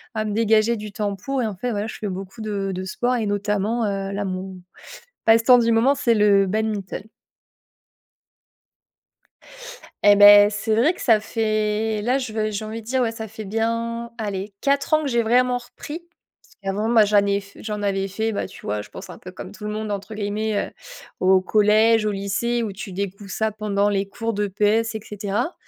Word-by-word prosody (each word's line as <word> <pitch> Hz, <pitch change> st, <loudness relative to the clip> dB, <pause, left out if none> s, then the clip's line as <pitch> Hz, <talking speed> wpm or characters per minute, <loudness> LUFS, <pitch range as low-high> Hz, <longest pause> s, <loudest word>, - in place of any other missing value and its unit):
à 215 Hz, 0 st, -1 dB
me 210 Hz, -, -2 dB
dégager 220 Hz, +1 st, +3 dB
du 210 Hz, -2 st, -7 dB
temps 205 Hz, -1 st, -2 dB
pour 265 Hz, +7 st, -3 dB
et -, -, 0 dB
en 210 Hz, -, -5 dB
fait, 245 Hz, +7 st, -3 dB
voilà, 210 Hz, 0 st, -2 dB
je -, -, -7 dB
fais 210 Hz, -, -4 dB
beaucoup 190 Hz, +4 st, -7 dB
de 200 Hz, -2 st, -2 dB
de 185 Hz, -, -4 dB
sport 240 Hz, +7 st, -1 dB
et 230 Hz, -3 st, -1 dB
notamment, 210 Hz, +3 st, 0 dB
heu, 195 Hz, -1 st, -2 dB
là, 200 Hz, +1 st, -3 dB
mon 185 Hz, 0 st, -5 dB, 0.7 s
passe-temps 230 Hz, +2 st, +6 dB
du 230 Hz, 0 st, +2 dB
moment, 230 Hz, +5 st, +4 dB
c'est 240 Hz, -4 st, +2 dB
le 200 Hz, -2 st, +4 dB
badminton. 210 Hz, -1 st, -2 dB, 3.0 s
Et 205 Hz, 0 st, +7 dB
beh, 205 Hz, 0 st, +9 dB
c'est 215 Hz, +1 st, -1 dB
vrai 270 Hz, +11 st, +3 dB
que -, -, -13 dB
ça 225 Hz, -4 st, +4 dB
fait 215 Hz, -1 st, -1 dB
là, 245 Hz, +5 st, +1 dB
je 255 Hz, -5 st, -3 dB
veux 215 Hz, -1 st, -1 dB
j'ai 210 Hz, +1 st, -4 dB
envie 220 Hz, +1 st, -6 dB
de 220 Hz, -, -17 dB
dire, 260 Hz, +2 st, +1 dB
ouais, 230 Hz, -2 st, 0 dB
ça 220 Hz, -1 st, -7 dB
fait 220 Hz, +1 st, -8 dB
bien, 230 Hz, +2 st, -2 dB
allez 205 Hz, -2 st, -4 dB
4 280 Hz, +2 st, +2 dB
ans 310 Hz, -, +3 dB
que 290 Hz, -, -2 dB
j'ai 235 Hz, -1 st, +2 dB
vraiment 245 Hz, +2 st, +2 dB
repris. 295 Hz, +6 st, -9 dB, 0.4 s
Parce -, -, -24 dB
qu'avant, 200 Hz, +3 st, -2 dB
ben, 230 Hz, -2 st, +5 dB
j'en 205 Hz, -1 st, +3 dB
ai 200 Hz, 0 st, +1 dB
f 200 Hz, 0 st, -17 dB
j'en 210 Hz, -1 st, -5 dB
avais 195 Hz, -1 st, -1 dB
fait, 220 Hz, +3 st, -2 dB
bah, -, -, -2 dB
tu -, -, -14 dB
vois 105 Hz, 0 st, -2 dB
je 105 Hz, -, -10 dB
pense -, -, -10 dB
un -, -, -10 dB
peu 185 Hz, -, -10 dB
comme 185 Hz, +1 st, -9 dB
tout 210 Hz, -, -11 dB
le 210 Hz, -, -3 dB
monde 215 Hz, 0 st, -4 dB
entre 200 Hz, +2 st, -5 dB
guillemets, 210 Hz, +1 st, -2 dB
heu, -, -, -2 dB, 0.5 s
au 185 Hz, 0 st, +4 dB
collège 215 Hz, +2 st, +4 dB
au 210 Hz, -, 0 dB
lycée 215 Hz, +5 st, -1 dB
où 215 Hz, -, -3 dB
tu 200 Hz, 0 st, -8 dB
découvres 200 Hz, +1 st, -5 dB
ça 220 Hz, +3 st, -1 dB
pendant 205 Hz, -1 st, 0 dB
les 195 Hz, -1 st, -1 dB
cours 225 Hz, +3 st, -3 dB
d'EPS 210 Hz, +2 st, 0 dB
et 220 Hz, -, -4 dB
cetera 210 Hz, -, -3 dB
215 Hz, 210 wpm, -22 LUFS, 200-225 Hz, 3.0 s, beh